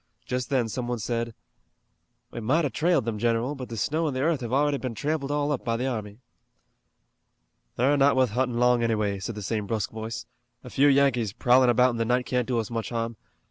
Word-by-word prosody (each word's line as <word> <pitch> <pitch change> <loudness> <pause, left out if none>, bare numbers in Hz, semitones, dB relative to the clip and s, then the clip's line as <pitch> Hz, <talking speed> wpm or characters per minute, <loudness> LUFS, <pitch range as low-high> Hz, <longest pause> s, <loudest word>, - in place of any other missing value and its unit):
Just 125 -1 -3
then 130 -4 +1
some 120 +2 -4
one 120 0 -1
said: 115 0 -3 1.0
"We - - -6
might 135 +10 +1
have 145 - -3
trailed 165 -7 +1
'em, 110 -2 -2
general, 115 +4 +1
but 130 -3 -7
the 115 - -6
snow 155 +8 0
an' 140 - -2
the 130 - -1
earth 160 -3 +1
have 120 -1 -5
already 145 +2 +2
been 125 -3 -4
tramped 145 +3 -2
all 145 0 0
up 140 - -2
by 115 -1 -1
the 125 - -2
army." 110 -3 -4 1.5
"They're 135 +4 +3
not 140 0 +4
wuth 130 -4 +2
huntin' 125 +1 0
long 125 0 +3
anyway," 105 -4 0
said 100 +4 -5
the 105 - -6
same 105 0 -2
brusque 110 +1 -2
voice. 110 +1 -6 0.4
"A 125 - -10
few 140 +2 +4
Yankees 135 -7 +3
prowlin' 125 +2 +4
about 125 +1 +4
in 120 - -4
the 115 - 0
night 125 +2 +1
can't 125 -2 -1
do 125 -2 0
us 115 0 -2
much 115 -1 -3
harm. 115 -1 -3
125 Hz, 220 wpm, -26 LUFS, 115-135 Hz, 1.5 s, not